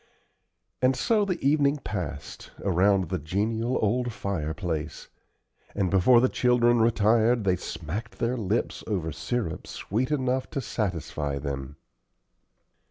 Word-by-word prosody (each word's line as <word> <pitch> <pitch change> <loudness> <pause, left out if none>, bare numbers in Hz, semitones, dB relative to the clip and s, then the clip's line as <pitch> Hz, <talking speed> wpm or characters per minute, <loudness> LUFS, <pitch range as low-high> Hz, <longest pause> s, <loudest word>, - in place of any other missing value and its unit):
And 130 +1 +4
so 215 - +2
the 185 -3 -2
evening 145 0 +3
passed, 105 -9 -6
around 95 -1 +3
the 95 -1 -1
genial 110 - -1
old 120 +3 +1
fireplace; 80 -5 -4 0.7
and 95 -3 0
before 100 +6 +6
the 130 - +4
children 120 -2 +3
retired 115 +1 +3
they 95 -2 +2
smacked 80 +5 -6
their 120 +2 0
lips 110 -1 -1
over 90 -7 -1
sirup 105 - -3
sweet 120 +7 -2
enough 130 -3 0
to - - -3
satisfy 90 - -2
them. 70 0 -5
105 Hz, 120 wpm, -27 LUFS, 90-125 Hz, 0.7 s, before